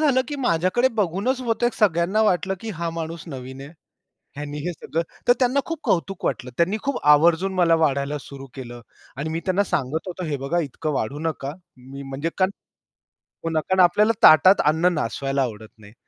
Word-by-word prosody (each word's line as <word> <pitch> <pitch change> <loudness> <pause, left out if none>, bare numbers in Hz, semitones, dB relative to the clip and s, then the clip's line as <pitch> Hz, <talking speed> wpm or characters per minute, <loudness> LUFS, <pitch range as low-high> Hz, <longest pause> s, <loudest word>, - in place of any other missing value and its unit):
झालं, 280 -4 +3
की 290 - -4
माझ्याकडे 240 +1 +2
बघूनच 210 +6 0
बहुतेक, 240 0 0
सगळ्यांना 195 +1 +2
वाटलं, 190 -1 +1
की 225 - -5
हा 170 -1 -2
माणूस 165 0 -5
नवीन 130 -2 -8
आहे. 140 +4 -10 0.6
ह्यांनी 145 0 -6
हे 180 - -1
सगळं 165 +1 -3 0.3
तर 245 - +7
त्यांना 255 +2 +2
खूप 330 -2 -4
कौतुक 185 +1 -1
वाटलं. 125 -1 -2
त्यांनी 185 +5 +2
खूप 280 -2 -1 0.2
आवर्जून 170 +5 +3
मला 175 -3 +4
वाढायला 145 -2 0
सुरू 135 0 -10
केलं. 120 -2 -8 0.4
आणि 150 +3 -3
मी 165 +1 -2
त्यांना 190 +1 +2
सांगत 155 0 -2
होतो, 180 0 -5
हे 150 -4 -2
बघा 140 +6 -1
इतकं 150 +2 -4
वाढू 135 +4 -2
नका. 155 -4 -3 0.3
मी 135 +2 -10
म्हणजे 135 +4 -4
कारण 185 0 +3 0.9
हो 165 - -1
ना, 160 -1 +1
कारण 190 +4 -1
आपल्याला 205 +5 +4
ताटात 185 +6 +7
अन्न 170 +3 +2
नासवायला 135 0 -2
आवडत 110 -4 -4
नाही. 110 0 -16
165 Hz, 185 wpm, -23 LUFS, 140-190 Hz, 0.9 s, तर